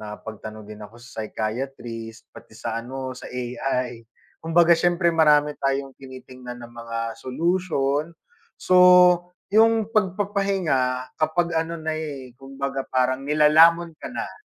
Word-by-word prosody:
nakapagtanong 110 Hz, 0 st, -9 dB
din 105 Hz, 0 st, -11 dB
ako 105 Hz, +2 st, -11 dB
sa 120 Hz, -1 st, -9 dB
psychiatrist, 115 Hz, 0 st, -5 dB
pati 110 Hz, -, -15 dB
sa, 115 Hz, 0 st, -4 dB
ano, 130 Hz, +2 st, -6 dB
sa 125 Hz, -, -10 dB
AI. 125 Hz, -1 st, -3 dB, 0.4 s
Kumbaga 165 Hz, +1 st, +4 dB
siyempre, 175 Hz, +1 st, +2 dB
marami 150 Hz, -2 st, +4 dB
tayong 135 Hz, 0 st, -1 dB
tinitingnan 130 Hz, -2 st, -10 dB
na 120 Hz, -, -12 dB
mga 115 Hz, -1 st, -5 dB
solution. 155 Hz, 0 st, -1 dB, 0.5 s
So 185 Hz, -, +1 dB, 0.8 s
'yong 225 Hz, 0 st, +3 dB
pagpapahinga, 190 Hz, -, 0 dB
kapag 170 Hz, +2 st, +1 dB
ano 165 Hz, +1 st, -4 dB
na, 160 Hz, -1 st, -3 dB
eh, 145 Hz, -5 st, -6 dB
kumbaga 135 Hz, 0 st, -5 dB
parang 130 Hz, 0 st, +1 dB
nilalamon 160 Hz, +3 st, +5 dB
ka -, -, -6 dB
na. 255 Hz, -, -7 dB
135 Hz, 125 wpm, -23 LUFS, 120-165 Hz, 0.8 s, nilalamon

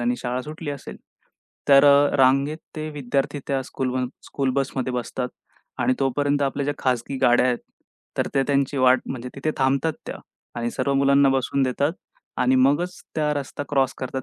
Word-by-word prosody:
आणि 120 Hz, +1 st, 0 dB
शाळा 125 Hz, +1 st, -2 dB
सुटली 150 Hz, +2 st, -6 dB
असेल, 140 Hz, -2 st, -7 dB, 0.7 s
तर 140 Hz, 0 st, +7 dB
अ, 145 Hz, 0 st, +5 dB
रांगेत 135 Hz, +3 st, +3 dB, 0.2 s
ते 155 Hz, 0 st, -4 dB
विद्यार्थी 140 Hz, 0 st, -2 dB
त्या 135 Hz, -1 st, 0 dB
स्कूल 130 Hz, 0 st, -3 dB
बस 130 Hz, -1 st, -1 dB, 0.2 s
स्कूल 135 Hz, -2 st, -1 dB
बसमध्ये 130 Hz, -1 st, -2 dB
बसतात 125 Hz, +1 st, -3 dB, 0.5 s
आणि 130 Hz, -, +2 dB
तोपर्यंत 145 Hz, +2 st, +1 dB
आपल्या 140 Hz, +1 st, -1 dB
ज्या 145 Hz, +1 st, -1 dB
खाजगी 130 Hz, +1 st, -1 dB
गाड्या 120 Hz, +1 st, +5 dB
आहेत, 125 Hz, -2 st, +1 dB, 0.6 s
तर -, -, +1 dB
त्या 135 Hz, -, +3 dB
त्यांची 140 Hz, 0 st, +1 dB
वाट 130 Hz, 0 st, +5 dB
म्हणजे 125 Hz, -1 st, -5 dB
तिथे 140 Hz, +3 st, -2 dB
थांबतात 135 Hz, +4 st, +2 dB
त्या -, -, -5 dB, 0.4 s
आणि 120 Hz, 0 st, -1 dB
सर्व 140 Hz, +3 st, -1 dB
मुलांना 140 Hz, 0 st, +4 dB
बसवून 135 Hz, +1 st, 0 dB
देतात 140 Hz, +4 st, +1 dB, 0.5 s
आणि 125 Hz, +1 st, +3 dB
मगच 145 Hz, +8 st, +2 dB
त्या 150 Hz, -1 st, +1 dB
रस्ता 145 Hz, 0 st, -4 dB
क्रॉस 135 Hz, -2 st, +1 dB
करतात 130 Hz, 0 st, -4 dB
135 Hz, 175 wpm, -23 LUFS, 130-145 Hz, 0.7 s, तर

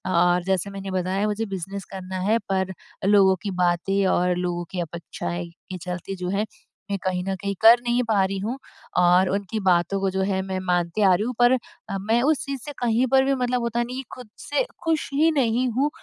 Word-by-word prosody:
और 175 Hz, +1 st, +3 dB
जैसे 190 Hz, 0 st, 0 dB
मैंने 195 Hz, -1 st, -6 dB
बताया 185 Hz, +2 st, 0 dB
मुझे 210 Hz, +2 st, -1 dB
बिज़नेस 195 Hz, -1 st, -5 dB
करना 185 Hz, -1 st, -5 dB
है 225 Hz, -, +4 dB
पर 190 Hz, -1 st, 0 dB, 0.3 s
लोगों 195 Hz, -2 st, +5 dB
की 200 Hz, -, -2 dB
बातें 185 Hz, +3 st, +1 dB
और 180 Hz, 0 st, +2 dB
लोगों 175 Hz, -1 st, -2 dB
की 185 Hz, -, -4 dB
अपेक्षाएँ 170 Hz, +1 st, -5 dB
के 185 Hz, +2 st, -10 dB
चलते 180 Hz, +2 st, -5 dB
जो 180 Hz, -1 st, -4 dB
है, 200 Hz, +3 st, 0 dB, 0.5 s
मैं 200 Hz, -, 0 dB
कहीं 180 Hz, -1 st, -1 dB
न 195 Hz, 0 st, -2 dB
कहीं 200 Hz, 0 st, -2 dB
कर 230 Hz, +2 st, +8 dB
नहीं 240 Hz, +1 st, +1 dB
पा 215 Hz, -4 st, +2 dB
रही 195 Hz, 0 st, -3 dB
हूँ 225 Hz, +7 st, -3 dB, 0.4 s
और 180 Hz, +1 st, +5 dB
उनकी 200 Hz, +2 st, -2 dB
बातों 180 Hz, +2 st, +3 dB
को 195 Hz, -, +1 dB
जो 190 Hz, -, -1 dB
है 190 Hz, -1 st, 0 dB
मैं 190 Hz, -1 st, -3 dB
मानती 180 Hz, +1 st, 0 dB
आ 195 Hz, -2 st, +6 dB
रही 185 Hz, +4 st, +1 dB
हूँ। 250 Hz, -, -2 dB
पर 245 Hz, 0 st, +6 dB
अ, 230 Hz, -5 st, -5 dB
मैं 225 Hz, +4 st, +1 dB
उस 305 Hz, 0 st, +2 dB
चीज़ 275 Hz, -3 st, -4 dB
से 295 Hz, -, -5 dB
कहीं 240 Hz, +1 st, +2 dB
पर 265 Hz, 0 st, +5 dB
भी 275 Hz, 0 st, +2 dB
मतलब 250 Hz, -1 st, 0 dB
होता 235 Hz, 0 st, 0 dB
नहीं 250 Hz, +2 st, -6 dB
कि 265 Hz, -, -4 dB
खुद 250 Hz, -4 st, -11 dB
से -, -, 0 dB, 0.2 s
खुश 325 Hz, -2 st, 0 dB
ही 310 Hz, +4 st, +4 dB
नहीं 250 Hz, -3 st, +1 dB
हूँ। 270 Hz, +6 st, +1 dB
195 Hz, 220 wpm, -24 LUFS, 180-235 Hz, 0.5 s, कर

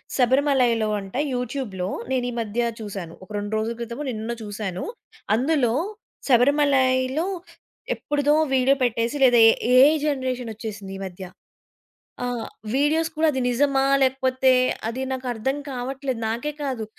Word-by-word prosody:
శబరిమలైలో 250 Hz, -4 st, +3 dB
అంట 195 Hz, +1 st, -10 dB, 0.2 s
యూట్యూబ్‌లో 245 Hz, -7 st, -3 dB, 0.2 s
నేనీ 250 Hz, -1 st, 0 dB
మధ్య 230 Hz, +2 st, -1 dB
చూశాను. 195 Hz, -6 st, -6 dB
ఒక 185 Hz, -, -16 dB
2 205 Hz, +1 st, -4 dB
రోజుల 225 Hz, +2 st, -2 dB
క్రితమో 235 Hz, +4 st, -5 dB
నిన్నో 225 Hz, 0 st, -3 dB
చూసాను. 205 Hz, -3 st, -4 dB, 0.5 s
అందులో 260 Hz, -1 st, +2 dB, 0.6 s
శబరిమలైలో 265 Hz, +2 st, +3 dB, 0.7 s
ఎప్పుడుదో 290 Hz, 0 st, 0 dB, 0.2 s
వీడియో 265 Hz, +2 st, +4 dB
పెట్టేసి 235 Hz, +3 st, 0 dB
లేదా 245 Hz, -2 st, +6 dB
ఏ -, -, +9 dB, 0.3 s
ఏఐ 275 Hz, +5 st, +8 dB
జనరేషన్ 255 Hz, -4 st, -2 dB
వచ్చేసింది 210 Hz, -3 st, -7 dB
ఈ -, -, -9 dB
మధ్య. 185 Hz, 0 st, -8 dB, 1.0 s
ఆహ్, 245 Hz, -2 st, -3 dB, 0.3 s
వీడియోస్ 315 Hz, +4 st, +2 dB
కూడా 315 Hz, +1 st, +3 dB
అది 265 Hz, -, -2 dB
నిజమా? 270 Hz, +2 st, +2 dB, 0.2 s
లేకపోతే 260 Hz, 0 st, +2 dB, 0.4 s
అది 245 Hz, +3 st, -4 dB
నాకర్థం 255 Hz, +1 st, -2 dB
కావట్లేదు. 260 Hz, -1 st, -4 dB
నాకే 235 Hz, +7 st, -2 dB
కాదు 255 Hz, -6 st, -2 dB
250 Hz, 125 wpm, -23 LUFS, 225-270 Hz, 1.0 s, ఏ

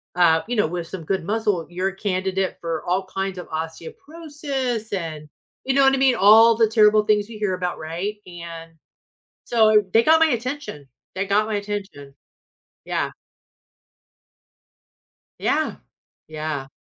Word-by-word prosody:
uh, 165 Hz, -2 st, +4 dB
you 245 Hz, -, -2 dB
know, 210 Hz, -, +2 dB
with 170 Hz, 0 st, -5 dB
some 180 Hz, -2 st, -7 dB
good 190 Hz, 0 st, -1 dB
muscle, 205 Hz, -3 st, -1 dB
you're 185 Hz, +2 st, -1 dB
a 195 Hz, -, -11 dB
candidate 190 Hz, -1 st, -2 dB
for 165 Hz, -2 st, -3 dB
all 185 Hz, +2 st, 0 dB
kinds 190 Hz, 0 st, -4 dB
of 180 Hz, -, -7 dB
osteoporosis. 265 Hz, -, -5 dB
And 160 Hz, -5 st, -5 dB, 0.4 s
you 265 Hz, -, +1 dB
know 275 Hz, -, +5 dB
what 270 Hz, 0 st, +5 dB
I -, -, +2 dB
mean? 265 Hz, -2 st, +3 dB
All 225 Hz, +2 st, +7 dB
the 225 Hz, -1 st, +4 dB
terrible 215 Hz, -1 st, +4 dB
things 210 Hz, 0 st, +1 dB
you 225 Hz, -, -9 dB
hear 205 Hz, -3 st, 0 dB
about, 180 Hz, -1 st, -3 dB
right? 170 Hz, +7 st, -4 dB
And 170 Hz, -2 st, -9 dB, 0.7 s
so, 215 Hz, -2 st, +4 dB
they 225 Hz, -, +6 dB
got 320 Hz, +1 st, +5 dB
my 325 Hz, -, +5 dB
attention. 255 Hz, -, -4 dB, 0.3 s
They 190 Hz, +1 st, -1 dB
got 205 Hz, +2 st, +2 dB
my 220 Hz, -, -2 dB
attention. 200 Hz, -9 st, -6 dB, 0.7 s
Yeah. -, -, -2 dB, 2.3 s
Yeah. -, -, 0 dB, 0.5 s
Yeah. 155 Hz, -3 st, -4 dB
195 Hz, 150 wpm, -22 LUFS, 170-225 Hz, 2.3 s, All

